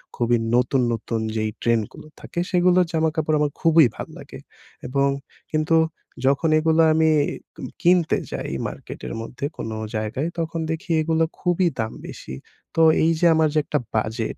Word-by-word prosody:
খুবই 120 0 +2 0.2
নতুন, 125 +1 +2
নতুন 115 0 -3 0.2
যেই 110 -1 -1
ট্রেন্ডগুলো 115 +4 -1
থাকে, 175 - -6
সেগুলোর 180 0 +4
জামাকাপড় 160 -1 +1
আমার 145 -1 +1
খুবই 165 -1 +6
ভাল - - -6
লাগে। - - -10 0.5
এবং 140 +2 +1 0.4
কিন্তু 155 +1 +1 0.5
যখন 140 +4 +2
এগুলা 160 +1 +3
আমি 160 0 +3 0.5
কিম - - -7
কিনতে 175 -2 +3
যাই - - -4 0.2
মার্কেটের - - -8
মধ্যে 125 +4 -6
কোন - - -4 0.3
জায়গায়, 110 +8 -2
তখন 165 0 -2
দেখি 165 +2 -4
এগুলো 160 +1 +1 0.2
খুবই 180 0 +2
দাম 110 0 -2
বেশি। 65 - -8 0.4
তো 165 - +3 0.2
এইযে 165 +1 +2
আমার 160 -1 +4
যে - - 0
একটা 150 0 -1 0.2
বাজেট, 110 +1 -2
155 Hz, 150 wpm, -23 LUFS, 120-165 Hz, 0.5 s, খুবই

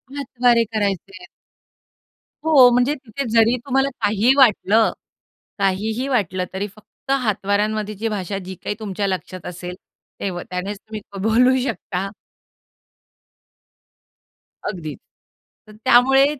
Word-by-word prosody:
हातवारे 245 -4 +2
करायचे 200 -3 -1
आहेत. 180 -1 -13 1.2
हो 280 -6 +7
म्हणजे 250 +4 +3
तिथे 270 0 -6
जरी 230 +1 +4
तुम्हाला 270 0 +2
काही 215 +4 +3
वाटलं, 220 -3 +4 0.7
काहीही 215 +6 0
वाटलं, 185 -8 0
तरी 195 +2 -2
फक्त 220 +5 -10
हातवाऱ्यांमध्येची 210 0 -1
भाषा 195 -2 -3
जी 190 +1 -7
काही 205 - -2
तुमच्या 200 -2 -2
लक्षात 185 -1 -4
असेल, 180 0 -6 0.4
तेव 185 -3 -3
त्यानेच 185 +3 -4
तुम्ही 215 0 -8
क 200 - -8
बोलू 245 +5 +4
शकता. 195 -6 -3 2.6
अगदीच. 155 -8 -5 0.7
तर - - -13
त्यामुळे 265 +2 +6
215 Hz, 110 wpm, -21 LUFS, 195-245 Hz, 2.6 s, हो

